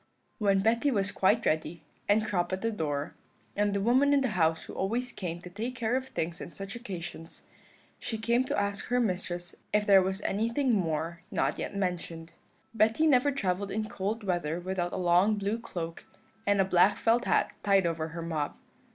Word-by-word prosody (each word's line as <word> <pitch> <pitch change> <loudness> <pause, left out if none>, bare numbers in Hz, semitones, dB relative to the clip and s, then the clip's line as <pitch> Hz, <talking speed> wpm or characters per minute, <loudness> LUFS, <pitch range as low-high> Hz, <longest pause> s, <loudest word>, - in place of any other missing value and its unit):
"When 200 -2 +3
Betty 230 +6 +2
was 200 -5 0
quite 215 +4 +2
ready, 155 +1 -1 0.3
and 215 +1 +4
Crop 175 -4 -1
at 185 +2 -3
the 230 - +1
door, 150 -6 -2 0.4
and 205 0 +2
the 200 - 0
woman 260 +6 +4
in 280 - +3
the 260 - +1
house 160 -5 +1
who - - -9
always 240 +6 -1
came 175 -3 -5
to 180 - -9
take 230 +6 -4
care 240 0 0
of 260 0 -2
things 170 -7 -4
on 170 - -8
such 195 +5 -7
occasions, 175 -7 -7 0.5
she 225 - -4
came 235 +3 +2
to - - -2
ask 200 0 -2
her 245 0 +1
mistress 180 -5 -2 0.2
if 210 0 +2
there 195 -2 +7
was 190 +1 -1
anything 230 +6 +1
more 165 -3 -1
not 200 - 0
yet - - -4
mentioned. 170 -4 -3 0.4
"Betty 225 +7 +3
never 285 -2 +4
travelled 200 -6 -1
in 215 +2 -2
cold 210 +3 -3
weather 175 -4 -1
without 175 -1 -2
a - - -3
long 180 +4 +4
blue 205 +2 -1
cloak, 170 -7 -6 0.4
and 205 -1 +3
a 195 - +4
black 185 +1 +4
felt 235 +2 +2
hat - - +2
tied 195 -2 +3
over 165 -1 -1
her 165 +1 -6
mob. 155 -3 -3
195 Hz, 195 wpm, -29 LUFS, 175-225 Hz, 0.5 s, there